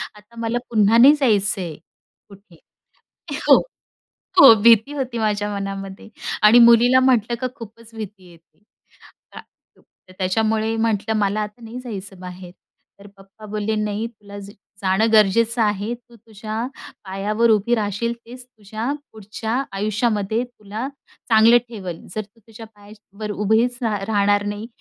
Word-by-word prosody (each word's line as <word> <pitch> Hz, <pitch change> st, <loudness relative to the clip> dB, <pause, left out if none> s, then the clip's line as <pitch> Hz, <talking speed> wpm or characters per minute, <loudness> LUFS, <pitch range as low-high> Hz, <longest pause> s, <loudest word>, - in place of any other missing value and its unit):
आता 210 Hz, +3 st, -19 dB
मला 230 Hz, +1 st, -1 dB
पुन्हा 220 Hz, 0 st, +3 dB
नाही 270 Hz, +5 st, +8 dB
जायचंय 200 Hz, -, 0 dB, 0.6 s
कुठे. 200 Hz, -3 st, -18 dB, 0.9 s
हो, -, -, +10 dB, 0.8 s
हो 270 Hz, -5 st, +10 dB
भीती 230 Hz, +4 st, +5 dB
होती 260 Hz, -4 st, -4 dB
माझ्या 210 Hz, -1 st, -1 dB
मनामध्ये 195 Hz, +1 st, -6 dB, 0.3 s
आणि 225 Hz, +3 st, +7 dB
मुलीला 235 Hz, +2 st, +6 dB
म्हटलं 240 Hz, -3 st, +2 dB
का 255 Hz, -, 0 dB
खूपच 230 Hz, -1 st, -13 dB
भीती 200 Hz, -4 st, -9 dB
येते. 165 Hz, +2 st, -23 dB, 1.5 s
त -, -, -13 dB
त्याच्यामुळे 220 Hz, +4 st, 0 dB
म्हटलं, 220 Hz, -1 st, 0 dB
"मला 205 Hz, +1 st, 0 dB
आता 210 Hz, +3 st, -7 dB
नाही 230 Hz, +3 st, -8 dB
जायचं 200 Hz, -6 st, -8 dB
बाहेर." 180 Hz, -1 st, -10 dB, 0.5 s
तर 200 Hz, -, -14 dB
पप्पा 195 Hz, +2 st, -15 dB
बोलले, 215 Hz, +1 st, -3 dB
"नाही 215 Hz, +1 st, -2 dB
तुला 205 Hz, -3 st, -12 dB
जा 200 Hz, 0 st, -11 dB, 0.3 s
जाणं 195 Hz, +4 st, +1 dB
गरजेचं 225 Hz, +3 st, +3 dB
आहे. 210 Hz, +2 st, 0 dB
तू 240 Hz, 0 st, -21 dB
तुझ्या 220 Hz, +1 st, -6 dB, 0.4 s
पायावर 210 Hz, +4 st, 0 dB
उभी 220 Hz, +3 st, +2 dB
राहशील 215 Hz, +2 st, -2 dB
तेच 245 Hz, +1 st, -11 dB
तुझ्या 220 Hz, +2 st, -6 dB, 0.2 s
पुढच्या 220 Hz, +4 st, -4 dB
आयुष्यामध्ये 215 Hz, +2 st, -1 dB
तुला 225 Hz, 0 st, -7 dB, 0.4 s
चांगलं 225 Hz, +2 st, +6 dB
ठेवल, 185 Hz, -7 st, -7 dB, 0.2 s
जर 215 Hz, -, -1 dB
तू 215 Hz, +3 st, -19 dB
तुझ्या 225 Hz, +1 st, -13 dB
पायावर 210 Hz, 0 st, -10 dB
उभीच 220 Hz, +4 st, +1 dB
रा 215 Hz, -2 st, 0 dB
राहणार 205 Hz, -1 st, +2 dB
नाही 205 Hz, +2 st, -5 dB
215 Hz, 135 wpm, -21 LUFS, 205-230 Hz, 1.5 s, हो